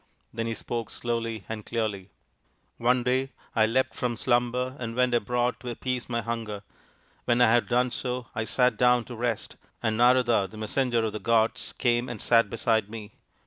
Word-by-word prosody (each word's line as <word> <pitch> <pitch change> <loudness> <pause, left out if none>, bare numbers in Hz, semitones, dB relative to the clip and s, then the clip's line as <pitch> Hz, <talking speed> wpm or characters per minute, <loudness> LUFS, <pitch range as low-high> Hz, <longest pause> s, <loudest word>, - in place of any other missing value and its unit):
Then 115 0 -2
he 115 - -2
spoke 115 +1 -4
slowly 115 -3 -3
and 110 -1 -5
clearly: 105 -5 -3 0.4
" - - -40 0.3
One 125 +1 +2
day 130 +2 +1 0.3
I 110 -1 +4
leapt 130 +4 +1
from 120 -2 -2
slumber 125 +1 +1
and 115 -2 -4
went 125 0 +2
abroad 120 +2 +1
to 125 +1 -6
appease 125 +1 -3
my 115 -1 -1
hunger. 110 -3 -4 0.6
When 120 0 +2
I 120 -2 +6
had 120 0 +3
done 125 +1 +2
so, 125 0 -3
I 110 - -2
sat 125 -1 +2
down 125 -1 +4
to 120 - -9
rest, 115 -2 -3 0.3
and 110 -1 +1
Narada, 120 -4 +4
the 110 - -12
Messenger 120 +2 0
of 110 -2 -1
the 105 - -4
Gods, 115 0 +1
came 120 -1 +1
and 120 -3 -6
sat 115 -1 +3
beside 110 -1 0
me. 110 -1 -8
120 Hz, 185 wpm, -27 LUFS, 110-125 Hz, 0.6 s, I